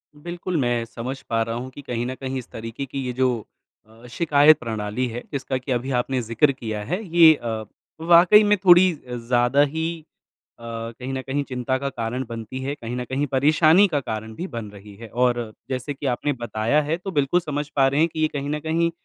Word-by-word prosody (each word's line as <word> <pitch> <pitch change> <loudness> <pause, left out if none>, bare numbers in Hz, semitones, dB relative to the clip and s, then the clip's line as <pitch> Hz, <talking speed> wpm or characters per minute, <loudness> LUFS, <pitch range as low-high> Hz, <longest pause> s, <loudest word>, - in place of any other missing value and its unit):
बिल्कुल, 175 +3 -4
मैं 120 -4 +1
समझ 125 +4 -6
पा 115 -1 +1
रहा 115 0 -4
हूँ 125 +2 -5
कि 145 - -10
कहीं 120 -3 -3
न 130 +1 -4
कहीं 130 0 -3
इस 125 - -10
तरीके 115 +4 -6
की 135 +1 -5
ये 125 - -3
जो 125 -3 0 0.4
अ, 115 +2 -18
शिकायत 150 +1 +5
प्रणाली 110 +1 -3
है, 120 +1 -5
जिसका 135 -2 -2
कि 130 +1 -6
अभी 125 +2 -1
आपने 130 +1 -1
ज़िक्र 115 +5 +2
किया 110 -5 -5
है, 180 - -2 0.2
ये 165 -2 +9
अ, 115 -5 -4 0.4
वाक़ई 175 +5 +7
में 210 0 +3
थोड़ी 180 +1 +7 0.2
अ, 125 - -5
ज़्यादा 120 +3 +2
ही 160 +3 -2 0.6
अ, - - -14 0.4
कहीं 130 +1 -5
न 130 - -2
कहीं 135 +2 -2
चिंता 130 -1 -2
का 140 +1 -3
कारण 120 0 -3
बनती 115 +2 -6
है। 140 +2 -3
कहीं 120 -3 -6
न 125 - -3
कहीं 135 +3 -1
परेशानी 155 +8 +5
का 150 -5 0
कारण 110 -4 -5
भी 180 - -5
बन 115 - -6
रही 100 0 -13
है 115 +3 -10
और 120 -2 0 0.2
जैसे 130 +2 -3
कि 140 - -9
आपने 135 +3 0
बताया 120 +3 0
है, 150 +3 -1
तो 190 +2 -6
बिल्कुल 145 +1 +2
समझ 150 -3 -4
पा 135 -2 +4
रहे 140 +2 +1
हैं 165 +2 +4
कि - - -5
ये 155 - +3
कहीं 140 0 -3
न 150 +1 -1
कहीं 165 +2 0
130 Hz, 220 wpm, -23 LUFS, 120-150 Hz, 0.6 s, ये